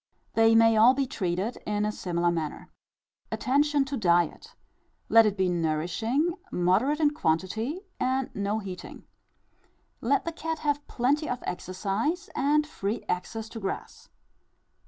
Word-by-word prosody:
They 225 0 +5
may 225 0 +6
all 235 +4 +7
be 275 0 +1
treated 195 -1 -2
in 210 0 -2
a 210 - 0
similar 175 -3 0
manner. 160 -3 -4 0.6
Attention 285 +2 +2
to 275 +1 -4
diet: 175 - +1 0.5
let 225 -1 +7
it 205 -1 -1
be 190 -1 +2
nourishing, 175 - 0 0.2
moderate 205 - +2
in 300 -2 +4
quantity, 220 - -1 0.2
and 260 +1 0
not 205 +2 -1
heating. 180 -2 -8 1.0
Let 275 +5 +1
the 335 - -2
cat 320 0 -4
have 290 -1 -1
plenty 285 +6 0
of 250 - -3
exercise 210 - -2
and 295 +2 +2
free 210 -7 -4
access 220 +5 -3
to 225 - -7
grass. 195 -2 -6
225 Hz, 135 wpm, -27 LUFS, 185-285 Hz, 1.0 s, all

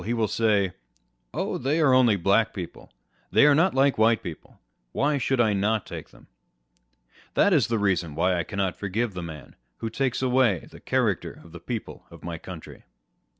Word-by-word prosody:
he 120 +3 -1
wall 110 -2 +1
say, 105 -4 +1 0.6
Oh, - - -2
they 145 +5 0
are 145 -5 +4
only 125 -4 +5
Black 100 +4 +2
people 90 -4 -7
â€" - - -41
they - - +6
are 150 - +6
not 165 +4 +3
like 135 -2 +3
White 115 +1 +3
people 85 -3 -8
â€" - - -30 0.4
why 145 +1 +1
should 135 0 0
I 110 -3 +3
not 105 +1 0
take - - -8
them - - -19 1.0
f - - -39
That 205 - +4
is 145 -8 +3
the 115 - 0
reason 90 -7 0
wThy 95 +4 +2
I 85 - 0
cannot 100 -1 -2
forgive 105 +3 -2
the 90 - -5
man 75 -4 -9 0.2
who 115 - -4
takes 130 +1 -1
away 125 -8 +2
the - - -13
character - - -1
of 85 - -15
the 85 - -10
people 115 +6 -6
of - - -14
my 85 -1 -5
country.' 90 -2 -10
110 Hz, 200 wpm, -25 LUFS, 95-130 Hz, 1.0 s, they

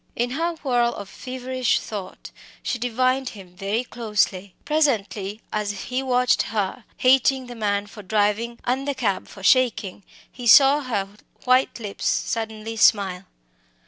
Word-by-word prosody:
In 245 +1 -1
her 330 +5 -1
whirl 240 -3 +1
of 200 - -7
feverish 255 +3 -2
thought, 195 -4 -8 0.3
she 245 - -2
divined 255 +2 0
him 180 -2 -13
very 200 +5 -1
closely. 210 -5 -1
Presently, 225 -9 0
as 205 -2 -2
he 255 +1 -1
watched 250 -1 +2
her 215 +2 -3
hating 260 0 +3
the 245 - -8
man 205 -3 -1
for 205 +1 -11
driving 210 +3 0
and 265 +3 -1
the 285 - -1
cab 215 -7 -1
for 195 - -13
shaking 220 -6 +2 0.3
he 245 -2 -6
saw 275 +4 +8
her 220 -7 -2 0.4
white 255 0 +2
lips 205 -3 -4
suddenly 225 0 -2
smile. 195 -4 +3
230 Hz, 145 wpm, -23 LUFS, 205-255 Hz, 0.4 s, saw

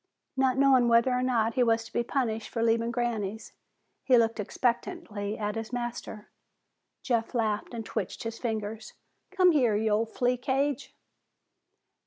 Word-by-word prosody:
Not 265 -1 +2
knowing 265 -3 +5
whether 235 +2 +4
or 250 0 +1
not 230 -3 +1
he 255 - +1
was 225 -1 +2
to - - -14
be - - +1
punished 230 -3 -2
for 230 - -2
leaving 230 0 +2
Granny's, 225 -3 -3 0.5
he 255 -2 +5
looked 230 -1 +2
expectantly 225 - -2
at 210 -1 -2
his 225 +1 -5
master. 240 -3 -5 0.7
Jeff 235 -2 -1
laughed 215 -3 -1
and 230 -2 -6
twitched 215 -4 -4
his 230 0 -5
fingers. 220 -2 -4 0.4
"Come 370 -2 +4
here, 250 -9 +3
you 215 +1 +1
old 220 +2 +1
flea 250 0 +1
cage." 275 +2 -1
230 Hz, 155 wpm, -28 LUFS, 220-250 Hz, 0.7 s, knowing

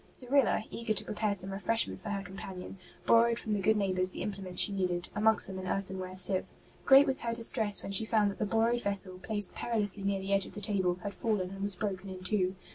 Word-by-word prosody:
Cyrilla, 260 -3 +2
eager 230 -2 -3
to - - +1
pre - - -5
pare 210 -1 -1
some 190 0 -3
refreshment 225 +4 -1
for 215 - -7
her 200 -1 -3
companion, 190 0 -9 0.3
borrowed 230 0 +4
from 215 - -4
the 205 - -1
good 215 +3 +2
neighbours 185 -2 0
the - - -6
implements 190 -3 -1
she - - +1
needed, 180 -3 -2
amongst 215 +1 +4
them 190 -1 -5
an 185 - -7
earthenware 190 -1 -4
sieve. 185 0 +7 0.4
Great 270 +1 +7
was 270 - +2
her 230 -1 -3
distress 225 -3 +1
when - - -6
she 200 +2 +4
found 215 -2 +1
that - - -12
the 215 - 0
borrowed 230 +2 +1
vessel, 195 -3 0
placed 205 -1 -2
perilously 210 -4 0
near 195 0 -1
the 195 +1 -3
edge 195 -1 +2
of - - -13
the - - -6
table, 190 -3 -1
had 205 - -5
fallen 200 -5 -2
and 195 0 -9
was 200 -1 0
broken 195 -1 -5
in 185 -1 -9
two. 185 -1 -1
200 Hz, 235 wpm, -30 LUFS, 190-220 Hz, 0.4 s, sieve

